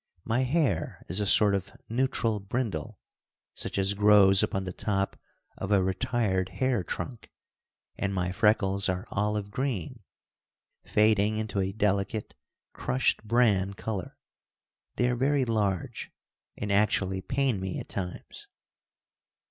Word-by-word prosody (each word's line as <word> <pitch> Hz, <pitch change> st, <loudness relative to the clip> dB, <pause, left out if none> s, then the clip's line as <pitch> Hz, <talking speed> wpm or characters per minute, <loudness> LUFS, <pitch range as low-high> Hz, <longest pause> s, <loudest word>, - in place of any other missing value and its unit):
My 115 Hz, +2 st, 0 dB
hair 130 Hz, -, 0 dB
is 90 Hz, +4 st, +1 dB
a 105 Hz, -, 0 dB
sort 105 Hz, 0 st, +7 dB
of 100 Hz, 0 st, -2 dB, 0.2 s
neutral 115 Hz, -3 st, 0 dB
brindle, 100 Hz, -5 st, -3 dB, 0.6 s
such -, -, -3 dB
as 95 Hz, +1 st, +2 dB
grows 100 Hz, -1 st, +6 dB
upon 95 Hz, -, -1 dB
the 90 Hz, -1 st, -5 dB
top 100 Hz, -1 st, -1 dB, 0.4 s
of 100 Hz, -, -4 dB
a 100 Hz, -2 st, +4 dB
retired 95 Hz, -2 st, 0 dB
hair 130 Hz, -7 st, 0 dB
trunk, 120 Hz, +7 st, -6 dB, 0.7 s
and 100 Hz, -, -1 dB
my 90 Hz, -2 st, -1 dB
freckles 100 Hz, -1 st, +2 dB
are 90 Hz, +2 st, -2 dB
olive 105 Hz, -1 st, -1 dB
green, 125 Hz, -, -3 dB, 0.8 s
fading 105 Hz, 0 st, +2 dB
into 110 Hz, -2 st, -2 dB
a 95 Hz, 0 st, 0 dB
delicate, 100 Hz, +1 st, -1 dB, 0.4 s
crushed 130 Hz, -2 st, 0 dB
bran 105 Hz, -4 st, +2 dB
color. 100 Hz, -4 st, -5 dB, 0.8 s
They 125 Hz, -, +2 dB
are 125 Hz, -, +1 dB
very 135 Hz, +2 st, +1 dB
large, 105 Hz, -6 st, -2 dB, 0.5 s
and 105 Hz, 0 st, -3 dB
actually 100 Hz, -2 st, +1 dB
pain 130 Hz, -2 st, 0 dB
me 95 Hz, -1 st, -4 dB
at -, -, -8 dB
times. 90 Hz, -3 st, -6 dB
105 Hz, 130 wpm, -28 LUFS, 95-115 Hz, 0.8 s, sort